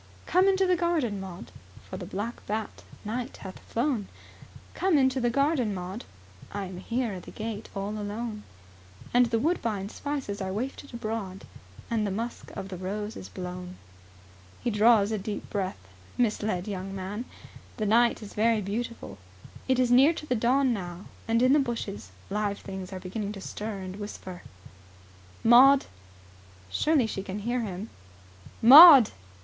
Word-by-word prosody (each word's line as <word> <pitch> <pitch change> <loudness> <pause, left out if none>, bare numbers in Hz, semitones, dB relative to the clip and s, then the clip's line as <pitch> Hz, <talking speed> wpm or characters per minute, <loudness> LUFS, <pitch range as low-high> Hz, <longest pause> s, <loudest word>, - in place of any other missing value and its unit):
"Come 370 +2 +3
into 385 0 +3
the 365 -1 +3
garden, 325 - 0
Maud, 185 -2 -9 0.4
For - - -7
the 185 -2 -7
black 205 +5 -5
bat, 215 +1 -4 0.2
night, 240 +4 -4
hath 190 -1 -8
flown, 235 -4 -2 0.7
Come 370 -4 +2
into 260 -1 +2
the 240 - +2
garden, 275 -4 +1
Maud, 185 +5 -6 0.5
I 200 -1 -4
am 185 -1 -8
here 235 +3 -2
at 185 - -7
the - - -12
gate 220 -1 -6
alone; 210 +2 -4 0.7
And 245 0 +5
the 230 0 0
woodbine 225 - -1
spices 270 -7 -4
are 190 0 -3
wafted 260 +7 -5
abroad, 215 -5 -5 0.5
And 215 -2 +1
the - - -1
musk 230 +5 -5
of 195 - -6
the 185 - -6
rose 205 +4 -4
is - - -9
blown." 180 0 -7 0.9
He 240 - 0
draws 210 -1 +4
a 215 - -1
deep 205 +2 -5
breath, 195 -2 -2 0.4
misled 210 -5 0
young 195 -1 -5
man. 200 +5 -5 0.5
The 215 - -1
night 230 +2 +3
is 205 - -10
very 225 +1 +2
beautiful. 205 - -5 0.5
It 260 -1 +2
is 250 -1 +2
near 270 +6 +6
to 305 - -7
the 255 - 0
dawn 250 +3 +2
now 180 -2 -6 0.2
and 230 +1 +2
in 255 +2 +5
the 300 - +5
bushes 230 - -4 0.2
live 205 -1 -1
things 190 -2 -8
are 190 - -5
beginning 200 +3 -5
to 195 - -9
stir 210 +1 -5
and 185 +1 -7
whisper. 190 -3 -8 1.0
"Maud!" 260 +4 +7 0.9
Surely 300 - +2
she 200 -3 -4
can 190 +1 -6
hear 240 +4 -1
him? 205 -2 -5 0.7
"Maud!" 275 -1 +11
215 Hz, 160 wpm, -27 LUFS, 195-245 Hz, 1.0 s, Maud